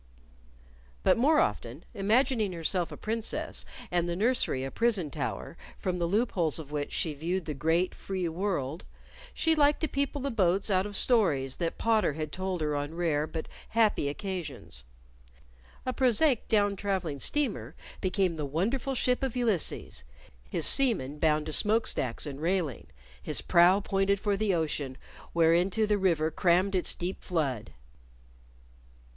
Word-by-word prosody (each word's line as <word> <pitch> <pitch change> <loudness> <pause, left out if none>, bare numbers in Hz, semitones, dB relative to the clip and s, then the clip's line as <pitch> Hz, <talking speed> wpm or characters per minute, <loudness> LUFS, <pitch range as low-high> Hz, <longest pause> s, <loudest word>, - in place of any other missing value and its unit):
But - - +5
more 300 +6 +4
often, - - -2
imagining 220 0 +1
herself 170 +1 -1
a - - -8
Princess, 225 +1 -3 0.3
and 175 -1 +1
the 170 - -1
nursery 210 - +1
a 135 - -4
prison 210 -10 +1
tower - - -4 0.2
from 180 -1 -2
the 170 - 0
loop 215 +7 +1
holes 165 -5 0
of 150 -3 -8
which 145 -1 -3
she 160 - -1
viewed 170 +5 -2
the 150 - -3
great, 165 +6 +1
free 185 -2 -3
world, 165 -4 -2 0.5
she 325 - +2
liked 295 -1 +3
to 315 - +1
people 280 0 -1
the 275 +1 -2
boats 195 -2 +1
out 190 +1 +2
of 205 -1 -5
stories 155 - +2
that 170 -2 -2
Potter 220 -8 +2
had 155 0 -4
told 185 -2 -3
her 150 -1 0
on 145 +2 -3
rare, 155 -3 0
but 160 0 -5 0.2
happy, 215 -10 +2
occasions. 150 - -6 1.0
A 255 - -1
prosaic 255 +1 +2
down 205 -2 +3
traveling 190 -8 -2
steamer 185 - 0 0.3
became 185 -3 0
the 150 - -3
wonderful 230 - -1
ship 250 0 +1
of 265 -3 -2
Ulysses, 215 - 0 0.5
his 160 - +1
seamen 185 - +3
bound 155 -1 +2
to 155 - -5
smokestacks 210 - +2
and 145 -1 -6
railing, 165 - -1 0.3
his - - +1
prow 180 +3 +5
pointed 195 0 +1
for 205 0 0
the 210 0 0
ocean 145 -5 -2 0.4
whereinto 175 +6 +3
the 210 -1 +1
River 165 -4 +2
crammed 180 +4 +2
its 185 -2 +2
deep 180 +2 -4
flood. 135 - -2
185 Hz, 155 wpm, -29 LUFS, 155-215 Hz, 1.0 s, But